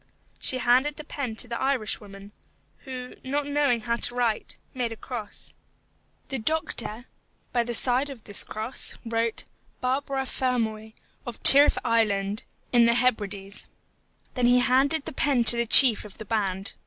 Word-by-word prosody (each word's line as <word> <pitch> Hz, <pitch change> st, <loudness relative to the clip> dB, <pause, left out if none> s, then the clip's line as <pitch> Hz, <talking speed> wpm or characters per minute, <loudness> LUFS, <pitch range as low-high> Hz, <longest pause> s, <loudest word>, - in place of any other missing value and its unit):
She 260 Hz, -, 0 dB
handed 255 Hz, +4 st, +1 dB
the 305 Hz, -, -9 dB
pen 275 Hz, -6 st, -6 dB
to 245 Hz, -, +2 dB
the 235 Hz, 0 st, -6 dB
Irish 265 Hz, -6 st, 0 dB
woman, 200 Hz, 0 st, -13 dB, 0.5 s
who, 255 Hz, -1 st, -8 dB
not 285 Hz, +2 st, -3 dB
knowing 285 Hz, -5 st, 0 dB
how 235 Hz, 0 st, -2 dB
to 240 Hz, -, -2 dB
write, 235 Hz, -3 st, -2 dB, 0.2 s
made 245 Hz, -3 st, -3 dB
a -, -, -6 dB
cross. 220 Hz, -2 st, -7 dB, 0.8 s
The 270 Hz, -, -4 dB
doctor, 240 Hz, -4 st, -2 dB, 0.5 s
by 240 Hz, -1 st, +1 dB
the 240 Hz, 0 st, -2 dB
side 255 Hz, +4 st, +1 dB
of 255 Hz, -6 st, -11 dB
this 205 Hz, -, 0 dB
cross, 220 Hz, +4 st, -3 dB
wrote, 230 Hz, 0 st, -2 dB, 0.3 s
BARBARA 270 Hz, +1 st, -2 dB
FERMOY, 220 Hz, -5 st, -3 dB, 0.3 s
of 240 Hz, -, -7 dB
Tyrrif 285 Hz, +2 st, +8 dB
Island, 210 Hz, -3 st, -1 dB, 0.3 s
in 235 Hz, -1 st, +5 dB
the 235 Hz, -, +2 dB
Hebrides. 205 Hz, -5 st, -3 dB, 0.7 s
Then 250 Hz, -2 st, 0 dB
he 245 Hz, +1 st, +4 dB
handed 275 Hz, +5 st, +1 dB
the -, -, -8 dB
pen 265 Hz, -3 st, 0 dB
to 235 Hz, -, +9 dB
the 235 Hz, 0 st, -2 dB
chief 240 Hz, -2 st, +8 dB
of 205 Hz, -2 st, -14 dB
the 220 Hz, -, -10 dB
band. 195 Hz, -3 st, -3 dB
240 Hz, 160 wpm, -25 LUFS, 220-260 Hz, 0.8 s, to